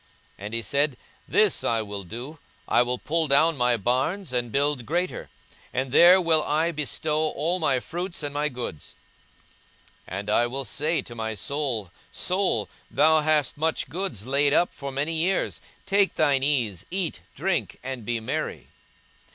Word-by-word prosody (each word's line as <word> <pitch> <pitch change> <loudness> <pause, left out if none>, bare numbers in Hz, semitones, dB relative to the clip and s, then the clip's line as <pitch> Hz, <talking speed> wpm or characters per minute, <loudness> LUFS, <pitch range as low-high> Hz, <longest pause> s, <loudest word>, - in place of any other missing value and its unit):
42:012:018 - - -33 0.4
And 105 - -6
he 115 - -1
said, 140 +4 0 0.3
This - - +3
will 105 -2 -1
I - - -13
do: 125 - -8 0.3
I - - +4
will 125 +1 0
pull 160 +5 -1
down 155 +4 +4
my 125 -2 +2
barns, 130 - -1
and 120 -2 -1
build 140 -1 +1
greater; 175 +3 -2 0.4
and 130 0 -2
there 175 +6 +8
will 165 -3 +3
I 155 +3 +1
bestow 155 0 -1
all 165 +6 -1
my 140 -6 +2
fruits 175 +4 -5
and 145 -1 -3
my 150 +1 0
goods. 120 - -7 1.1
42:012:019 90 - -5
And 100 +1 -6
I 120 +2 +3
will 135 +2 -4
say 155 +6 0
to 120 - -10
my 110 -1 -3
soul, 125 - -2 0.2
Soul, 185 +1 0 0.2
thou 160 0 +4
hast 150 -2 +1
much 160 +1 0
goods 160 - -3
laid 140 +2 +2
up 175 - +3
for 140 -1 -6
many 145 +4 -1
years; 175 +4 0 0.2
take 200 -1 +2
thine 145 -4 +3
ease, 120 - 0
eat, 185 -2 -2 0.2
drink, - - -1
and 130 -2 -5
be 120 +2 -1
merry. 110 - -4
145 Hz, 170 wpm, -25 LUFS, 120-160 Hz, 1.1 s, there